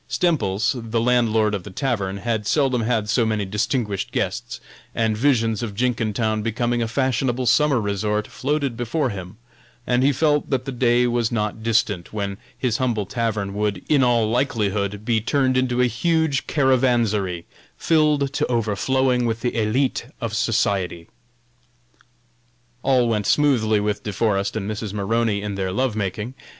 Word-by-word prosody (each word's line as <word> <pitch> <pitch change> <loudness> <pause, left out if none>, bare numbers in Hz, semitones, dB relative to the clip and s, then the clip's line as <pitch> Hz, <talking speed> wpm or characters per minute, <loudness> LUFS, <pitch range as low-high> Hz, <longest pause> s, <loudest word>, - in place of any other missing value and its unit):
Stemples, 130 - +1
the 115 -1 -2
landlord 115 -3 +2
of 100 - -2
the 105 - -10
tavern, 100 -3 -2
had 110 0 -2
seldom 135 -3 +2
had 110 -2 0
so 115 +3 +2
many 110 -2 0
distinguished 105 0 -2
guests, - - -3 0.4
and 110 -1 +1
visions 115 -3 +1
of 110 -4 -4
Jenkintown 110 -2 0
becoming 120 +2 -1
a 115 - 0
fashionable 130 0 0
summer 145 0 +3
resort 105 0 -1
floated 140 -2 -2
before 125 +4 -1
him, 95 +1 -8 0.5
and 125 0 +2
he 140 +2 +4
felt 150 +1 +1
that 130 -2 -1
the 135 - -3
day 120 -1 +2
was 120 -1 0
not 105 -1 -2
distant 110 -5 0
when 100 -1 -4 0.2
his 125 -3 0
humble 120 -5 0
tavern 110 -2 -2
would, 105 -2 -2
in 145 -3 +3
all 120 -3 +3
likelihood, 105 -4 -1
be 115 -2 +1
turned 130 +2 +1
into 125 -1 +1
a - - +5
huge 160 +3 0
caravansary, 120 - +1 0.3
filled 150 -4 +2
to - - 0
overflowing 125 +2 +1
with 115 0 -2
the 120 - 0
élite 115 +4 0
of 115 -4 -4
society. 100 -7 0 1.7
All 125 -2 +3
went 105 -3 0
smoothly 115 -8 +3
with 105 0 -1
De 105 - -4
Forest 100 -1 0
and 105 -3 -3
Mrs. 105 -1 -4
Maroney 105 0 0
in 105 -1 -3
their 95 -1 -2
love 125 +3 0
making. 105 +3 -3
115 Hz, 155 wpm, -22 LUFS, 105-125 Hz, 1.7 s, a